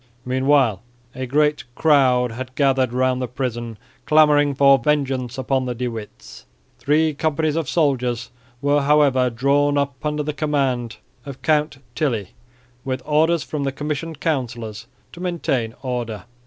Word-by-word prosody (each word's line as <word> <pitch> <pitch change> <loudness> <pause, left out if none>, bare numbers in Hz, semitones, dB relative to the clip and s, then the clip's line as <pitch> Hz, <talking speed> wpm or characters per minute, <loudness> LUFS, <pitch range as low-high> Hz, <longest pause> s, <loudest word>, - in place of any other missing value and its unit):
Meanwhile 130 -5 +2 0.3
a 130 0 -5
great 150 +3 +1
crowd 130 -5 +3
had 130 +2 -7
gathered 135 -3 +2
round 130 +1 +1
the 125 - -2
prison 120 -3 -4 0.3
clamouring 150 -2 +4
for 140 0 +5
vengeance 135 -2 -1
upon 130 0 0
the 125 - -3
De 125 +1 -2
Witts. 110 -3 -10 0.3
Three 155 +2 +2
companies 155 +1 0
of 165 -5 -2
soldiers 125 -7 0 0.3
were 145 +1 +3
however 140 -3 +3
drawn 140 +4 +1
up 140 -1 -2
under 150 0 -1
the 150 +1 -3
command 135 -6 -1 0.3
of 135 -1 -10
Count 150 -2 +1 0.2
Tilly 115 - -1 0.5
with 130 -1 -3
orders 160 +2 +2
from 150 -2 -4
the 135 - -1
Commissioned 150 +2 -4
Councillors 120 -8 -3 0.3
to - - -11
maintain 135 -10 -2
order. 120 -5 -4
135 Hz, 140 wpm, -21 LUFS, 125-150 Hz, 0.5 s, for